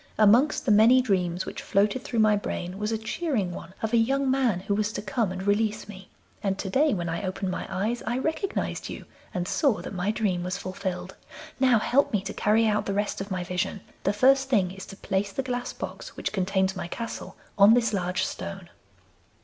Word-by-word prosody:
Amongst 230 +8 +4
the 240 - +3
many 225 +5 +7
dreams 185 -7 0
which - - -6
floated 205 +6 +1
through 235 - -4
my 215 -1 +5
brain 185 -2 -4
was 210 +1 -1
a 225 - 0
cheering 220 - -2
one 175 +1 -9
of 220 +1 -1
a - - +5
young 265 +4 +2
man 250 -9 +1
who 200 +2 -1
was 210 +1 0
to - - -3
come 210 0 0
and 185 0 -5
release 210 +1 0
me, 190 -2 -11 0.3
and 195 -1 -1
to 190 -1 -4
day, 295 +7 +3
when 175 -2 -3
I 165 0 -2
opened 190 -1 -3
my - - -4
eyes, 215 +6 -1
I 240 - 0
recognised 315 +8 -2
you - - -7 0.3
and 180 0 -3
saw 275 -3 +2
that - - -6
my 185 +2 -1
dream 205 -5 0
was 180 +2 -2
fulfilled. 185 -1 -5 0.4
Now 255 -3 +5
help 280 +6 +2
me 205 - +2
to 200 - -5
carry 220 +2 +3
out 210 -1 +1
the 200 - -1
rest 205 -1 -1
of 195 - -6
my 185 -2 -2
vision. 180 +2 -2 0.2
The 200 - +2
first 265 +5 +4
thing 195 -8 +2
is 190 0 -9
to 195 - -10
place 195 0 -1
the 270 - -2
glass 245 -1 -3
box - - -8
which - - -3
contains 190 0 +1
my 175 -2 -4
castle 230 +6 -6 0.2
on 205 +3 +7
this 230 -3 +1
large 180 -2 0
stone. 195 -2 -6
205 Hz, 215 wpm, -26 LUFS, 190-235 Hz, 0.4 s, many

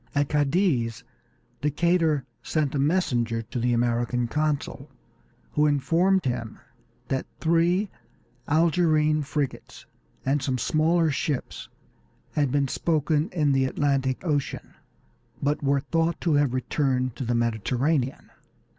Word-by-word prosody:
At 145 0 +1
Cadiz 145 - +1 0.6
Decatur 155 -1 +1 0.2
sent 150 -4 -1
a 145 - -1
messenger 125 -8 +1
to 115 +3 -5
the 120 +1 +1
American 120 0 0
consul, 150 +2 -2 0.6
who 150 0 +3
informed 170 +6 +2
him 120 -3 -3 0.5
that 135 - -1
three 170 +5 +2 0.6
Algerine 155 -1 +3
frigates 145 -1 -4 0.4
and 140 +2 +1
some 130 -1 -1
smaller 160 +5 +2
ships 140 -1 -3 0.6
had 145 -4 0
been 140 0 +1
spoken 155 +3 0
in 155 -7 +1
the 135 -1 +2
Atlantic 135 +1 0
Ocean, 145 -4 -2 0.7
but 145 +1 0
were 140 -1 +2
thought 165 +3 0
to 165 - +1
have 145 -3 +2
returned 130 -1 0
to - - -3
the 120 0 0
Mediterranean. 125 +4 -1
145 Hz, 120 wpm, -25 LUFS, 130-160 Hz, 0.7 s, who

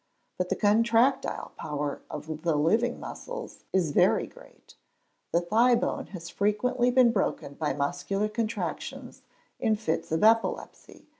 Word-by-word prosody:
But 180 0 -1
the - - +1
contractile 230 +5 +2
power 150 -1 -4
of 155 0 -6
the 165 -2 +1
living 220 +11 +2
muscles - - -8
is 180 -5 +1
very - - +3
great: - - -17 0.6
the 170 - +2
thigh 230 +7 +4
bone - - -2
has 170 -4 -8
frequently 240 +7 +1
been 250 -1 +5
broken 195 -9 -1
by 150 +1 -2
muscular 180 +8 -1
contractions 220 +1 -4 0.4
in 220 - +2
fits 205 -9 -3
of 160 +3 +1
epilepsy. 225 +1 +1
210 Hz, 135 wpm, -28 LUFS, 165-230 Hz, 0.6 s, been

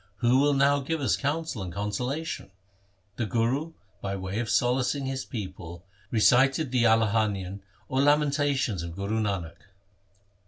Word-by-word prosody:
Who 120 +5 +3
will 145 0 +3
now 140 +1 +4
give 160 +4 -2
us 140 - +2
counsel 150 -4 -2
and 90 -2 -5
consolation? 125 - -3 0.3
' 100 0 -40
The 115 - -1
Guru 130 - 0 0.3
by 100 0 -3
way 95 +2 -4
of 120 -1 -2
solacing 130 +2 +1
his 130 0 -3
people 90 - -7 0.2
recited 130 +5 +3
the 125 -2 +2
Alahanian 105 -4 +1 0.3
or 130 +1 +1
Lamentations 145 - +2
of 85 0 -6
Guru 100 +3 -2
Nanak. 95 -6 -2
120 Hz, 145 wpm, -27 LUFS, 100-140 Hz, 0.3 s, now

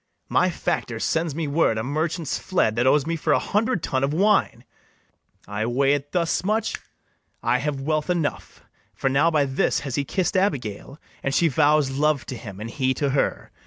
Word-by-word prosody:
My - - +3
factor - - -2
sends 160 -3 -1
me 160 -1 -2
word 140 -6 +2
a 110 - -2
merchant's 155 +4 -2
fled 140 - +1
That 120 +2 +2
owes 145 +1 +4
me 165 +1 -1
for 160 - +1
a - - +4
hundred 210 -2 0
tun 130 0 -1
of 140 +2 0
wine: 205 +3 +2 0.8
I 100 +2 -2
weigh 135 +3 +2
it 145 0 -3
thus 170 -2 0
much[snapping 215 +4 0
his - - -5
fingers]! - - -9 0.5
I 125 - +2
have 140 0 -2
wealth 155 +3 -1
enough; 170 -5 -2 0.3
For 135 - 0
now 145 +5 +4
by 150 -3 +2
this 135 -1 0
has 140 -3 -5
he 145 - 0
kiss'd 185 +6 -1
Abigail, 140 - -1 0.2
And 135 +1 -1
she 170 - +4
vows 150 -1 +3
love 145 +1 +1
to 130 - -6
him, 100 -5 -9
and 110 +2 -6
he 130 -1 0
to 140 -2 0
her. 140 - -1
145 Hz, 200 wpm, -24 LUFS, 135-165 Hz, 0.8 s, owes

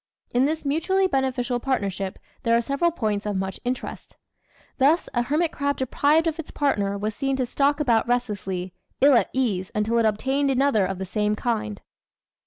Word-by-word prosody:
In 250 +2 +3
this 310 +1 -2
mutually 330 +7 +1
beneficial 260 -6 0
partnership 200 -7 -2 0.2
there 230 0 +3
are - - +2
several 280 +7 +1
points 215 -10 -2
of 205 - -1
much 190 0 -3
interest. 250 +1 -5 0.6
Thus 295 +6 +3
a 240 - +2
hermit 305 +7 0
crab 285 0 -1
deprived 290 +5 +2
of 325 0 -1
its 325 - -6
partner 200 -9 0
was 210 +2 -2
seen 270 +4 -1
to 260 -1 0
stalk 285 +4 +1
about 235 -7 +2
restlessly, 200 -7 -2 0.3
ill 280 +1 +6
at 240 - +3
ease 205 -8 -1
until 220 +2 +1
it 230 - +3
obtained 265 +7 0
another 265 -7 +2
of 195 0 -4
the 190 - -4
same 210 +2 0
kind. 110 - -2
245 Hz, 180 wpm, -24 LUFS, 210-280 Hz, 0.6 s, ill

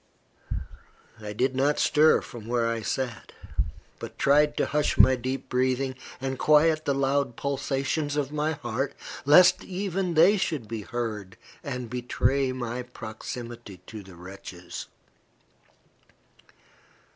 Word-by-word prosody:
I 105 -1 -5
did 130 +5 0
not 140 +3 +2
stir 155 +1 +5
from 115 -4 -10
where 120 -1 +1
I 115 0 -1
sat, 120 0 -3 0.7
but - - -8
tried 150 +2 +4
to - - +2
hush 150 +1 0
my 130 - +7
deep 130 +2 -4
breathing, 130 +1 +1 0.3
and 130 0 -3
quiet 155 +1 +4
the 140 - +1
loud 135 -2 +1
pulsations 140 +1 -1
of 145 -2 -1
my 150 +1 0
heart, 135 -1 -3 0.3
lest 180 +5 +7
even 190 -2 -2
they 180 +7 +6
should 155 - -2
be 115 -1 -4
heard 105 -2 -4 0.3
and 125 -4 -4
betray 125 +2 0
my 125 -1 -3
proximity 120 -2 -8
to 110 -2 -8
the 95 -2 -13
wretches. 90 0 -9
130 Hz, 125 wpm, -27 LUFS, 120-145 Hz, 0.7 s, my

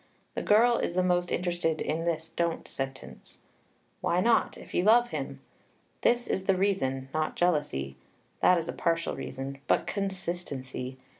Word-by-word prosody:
The - - -2
girl 235 +3 +5
is 170 - -2
the 185 - +3
most 180 -1 +1
interested 175 -3 0
in 165 +2 -1
this 165 -1 -1
don't 170 -1 -2
sentence. 135 -1 -7 0.6
Why 175 - +1
not, 230 +5 +3
if - - -12
you 175 - +2
love 240 +4 +5
him? - - -5 0.6
This 240 0 +3
is 190 - -2
the 195 - +3
reason, 135 -9 0
not 155 0 -1
jealousy, 145 - 0 0.4
that 180 - +5
is 165 -1 -2
a - - -3
partial 165 0 0
reason, 135 +1 -6
but - - +3
consistency. 170 -10 -3
170 Hz, 155 wpm, -29 LUFS, 140-190 Hz, 0.6 s, girl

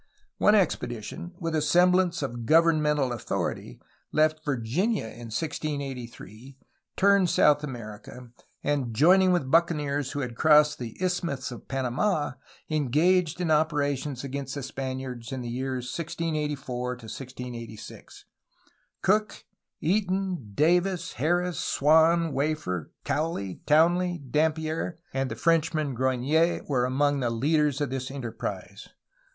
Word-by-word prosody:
One 210 - +5
expedition, 175 - -1
with 165 -2 -3
a 155 - +2
semblance 180 +1 +3
of 120 -4 -5
governmental 150 -4 +3
authority, 120 - -4 0.3
left 155 0 +2
Virginia 145 - 0
in 115 +1 -9
1683, 135 - -5 0.4
turned 200 -2 +4
South 150 -3 +4
America, 120 -1 -8 0.3
and 135 -6 -1
joining 185 - +5
with 145 -7 0
buccaneers 145 -4 +1
who 145 - -2
had 125 -3 -4
crossed 150 +2 +5
the 115 -3 -7
Isthmus 170 -8 -2
of 120 - -10
Panamd, 135 - 0 0.4
engaged 155 +4 +2
in 175 -3 0
opera 150 -2 +2
tions 135 -1 -6
against 140 0 -5
the 140 - -4
Spaniards 130 -3 -5
in 130 -1 -4
the 120 - -5
years 130 +1 -3
1684 150 -5 -3
1686. 120 -1 -9 0.8
Cook, 210 +2 +1 0.4
Eaton, 185 - -1
Davis, 175 +4 +2
Harris, 175 +5 0
Swan, 160 +2 +3
Wafer, 135 - -2
Cowley, 145 - -2
Townley, 175 +3 +3
Dampier, 160 +2 0 0.2
and 135 0 -1
the - - -4
Frenchman 160 -3 +1
Grogniet 130 +7 +1
were 125 -4 +1
among 145 +2 +1
the 120 -3 0
leaders 145 +4 +1
of 145 -3 -1
this 130 -1 -3
enterprise. 130 -4 -6
145 Hz, 120 wpm, -27 LUFS, 130-165 Hz, 0.8 s, One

